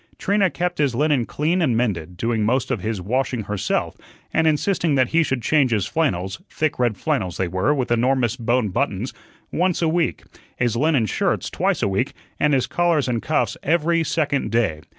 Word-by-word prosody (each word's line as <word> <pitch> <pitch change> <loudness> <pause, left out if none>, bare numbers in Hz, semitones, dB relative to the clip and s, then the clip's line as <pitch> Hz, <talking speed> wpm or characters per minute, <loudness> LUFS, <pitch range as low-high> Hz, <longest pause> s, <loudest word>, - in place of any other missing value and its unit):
Trina 200 -1 +2
kept 175 -1 -3
his 140 -5 +1
linen 145 -3 +2
clean 165 +5 0
and 125 -9 +2
mended, 90 -7 -2
doing 115 +1 0
most 125 +4 +1
of - - -1
his 110 -2 -2
washing 125 +4 -1
herself, 100 -1 -2 0.4
and 165 0 +3
insisting 160 0 +1
that 130 -2 +2
he 165 - +3
should 135 -6 -1
change 145 0 +3
his 105 -5 +1
flannels 95 - -1
thick 155 -4 -1
red 120 -5 +1
flannels 90 -1 -1
they 95 - 0
were, 95 +10 0
with 130 -5 -1
enormous 120 0 +2
bone 120 -2 0
buttons 120 +1 -2 0.4
once 180 +1 +1
a 165 - +1
week, 160 - 0 0.3
his 120 -2 0
linen 140 -2 +2
shirts 105 - -1
twice - - 0
a - - +3
week, 100 +8 -1 0.3
and 150 -1 +3
his 130 - +1
collars 170 -5 +1
and 120 -2 -1
cuffs 155 - 0
every 165 +2 +2
second 150 -4 0
day. 110 -10 0
130 Hz, 190 wpm, -22 LUFS, 110-155 Hz, 0.4 s, and